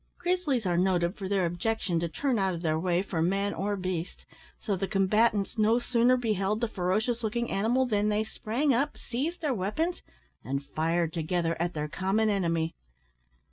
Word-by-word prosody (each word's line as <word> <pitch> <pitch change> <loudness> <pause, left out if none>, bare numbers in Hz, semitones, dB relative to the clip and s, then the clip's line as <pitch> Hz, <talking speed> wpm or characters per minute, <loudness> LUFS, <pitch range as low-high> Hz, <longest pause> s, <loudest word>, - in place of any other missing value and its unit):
Grizzlies 350 - 0
are 175 -1 +2
noted 180 0 +2
for 190 -2 -5
their 195 -3 +2
objection 175 0 -1
to 170 0 -2
turn 255 - 0
out 190 -2 +1
of 170 - -7
their 160 -1 +1
way 180 +1 +1
for 175 -5 -2
man 195 +4 +1
or 205 +1 -1
beast, 185 -2 -4 0.3
so 205 - -1
the 190 +1 -2
combatants 205 +2 +2
no 220 +2 +4
sooner 245 +1 +3
beheld 215 -3 0
the 235 - 0
ferocious 215 +4 -1
looking 235 +2 -1
animal 235 +6 +2
than 210 -3 +1
they 210 +1 +1
sprang 240 +6 0
up, 280 +5 0
seized 300 +10 -3
their 295 -4 +1
weapons, 270 - -1 0.4
and 140 +1 -3
fired 165 +2 0
together 165 0 0
at 175 0 -1
their 150 0 -2
common 195 +7 +1
enemy. 165 -4 0
200 Hz, 180 wpm, -28 LUFS, 175-230 Hz, 0.4 s, no